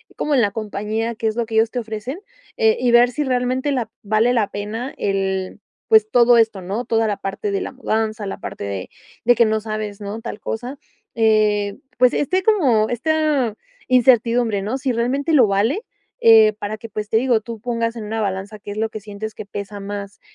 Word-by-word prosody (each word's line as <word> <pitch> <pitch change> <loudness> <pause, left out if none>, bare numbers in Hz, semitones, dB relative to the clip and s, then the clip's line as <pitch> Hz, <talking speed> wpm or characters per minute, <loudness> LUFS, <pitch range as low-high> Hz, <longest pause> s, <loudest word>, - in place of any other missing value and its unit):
como 295 -1 0
en 255 - +4
la 205 -3 +2
compañía 215 +2 -3
qué 225 - -6
es 220 0 +1
lo 235 -2 -1
que 225 - -5
ellos 220 0 +3
te 250 - -2
ofrecen, 225 - -5 0.4
eh, 445 -1 +3
y 245 - +2
ver 240 +1 +6
si 295 +5 -2
realmente 255 +2 0
la 245 -5 -1
vale 215 +4 +2
la 225 -5 +1
pena 220 +6 -5
el 190 -1 -1 0.3
pues, 220 -1 +5
todo 240 -1 +6
esto, 220 -4 +2
¿no?, 200 +7 -4
toda 225 -1 +1
la 205 -2 -1
parte 195 +1 -4
de 200 - -1
la - - -4
mudanza, 220 -5 -2
la 195 - -5
parte - - -7
de 100 -2 -5 0.3
de 245 - +5
que 235 - +4
no 220 0 +1
sabes, 215 -1 -5
¿no?, 205 +2 -5
tal 225 -2 -6
cosa, 245 +5 -5 0.4
eh, 210 -2 +2 0.2
pues, 250 0 +4
este 370 +6 0
como 270 - +3
esta 280 -2 0 0.3
incertidumbre, 235 -4 +3
¿no?, 220 +7 -2
si 265 -1 -1
realmente 260 +7 0
lo 255 -8 +6
vale, 215 - +1 0.4
eh, 220 -1 +7
para 210 +1 -4
que, 230 +1 -10
pues, 210 -1 -5
te 220 - +3
digo, 240 -2 +2
tú 230 0 -8
pongas 230 0 -2
en 225 - -6
una 220 +1 -3
balanza 200 +1 -3
qué 205 - -11
es 205 - -5
lo 220 +1 0
que 215 - -7
sientes 210 +1 -7
que 205 - -9
pesa 205 0 -6
más. 200 0 -7
220 Hz, 210 wpm, -20 LUFS, 210-245 Hz, 0.4 s, eh